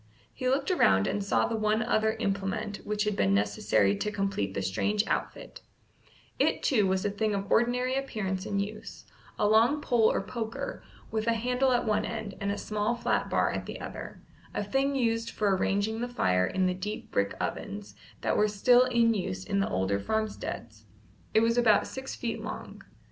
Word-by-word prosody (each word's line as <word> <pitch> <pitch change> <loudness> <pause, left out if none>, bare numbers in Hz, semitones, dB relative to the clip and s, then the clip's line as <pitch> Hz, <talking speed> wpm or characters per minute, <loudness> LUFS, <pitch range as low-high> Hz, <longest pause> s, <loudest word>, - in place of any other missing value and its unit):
He 255 - -1
looked 275 +6 +1
around 95 - +4
and 205 - -1
saw 200 - +2
the 230 - -2
one 215 0 +1
other 220 -1 +2
implement 200 -1 -2
which 210 0 -2
had 210 -1 0
been 100 - +2
necessary 100 0 +2
to 210 - -2
complete 195 - -2
the - - -1
strange 205 - 0
outfit; - - -4 0.8
it, - - +2
too, 215 -9 +3
was 190 +1 0
a 205 - +1
thing 210 +1 0
of 200 0 -4
ordinary 250 +2 +2
appearance 210 -8 -3
and 200 -1 -1
use: 205 +2 -6 0.3
a 210 - +2
long 230 +7 +4
pole 235 -6 +3
or - - -1
poker, 230 - -5 0.3
with 220 0 -2
a 230 - +4
handle 250 +3 +1
at 245 -1 +2
one 215 -1 +1
end 200 - -5
and 200 0 0
a 200 - -2
small 210 +3 -1
flat 235 - 0
bar - - +2
at - - -4
the - - -6
other, - - -7 0.4
a - - 0
thing 270 +7 0
used 230 -3 0
for 205 -3 +1
arranging 205 +4 0
the 245 - -1
fire 90 - +2
in 190 0 0
the 185 - +2
deep 205 +4 -6
brick 100 0 0
ovens 100 0 -4 0.3
that - - 0
were 210 - +4
still 245 +5 +5
in 235 -2 +3
use 95 - -3
at 200 - 0
the 195 - +1
older 95 +2 0
farmsteads. 115 - -4 0.5
It 220 - +6
was 230 +1 +3
about 220 -3 +4
six 265 0 -6
feet 235 - -3
long. - - -7
210 Hz, 190 wpm, -29 LUFS, 195-230 Hz, 0.8 s, It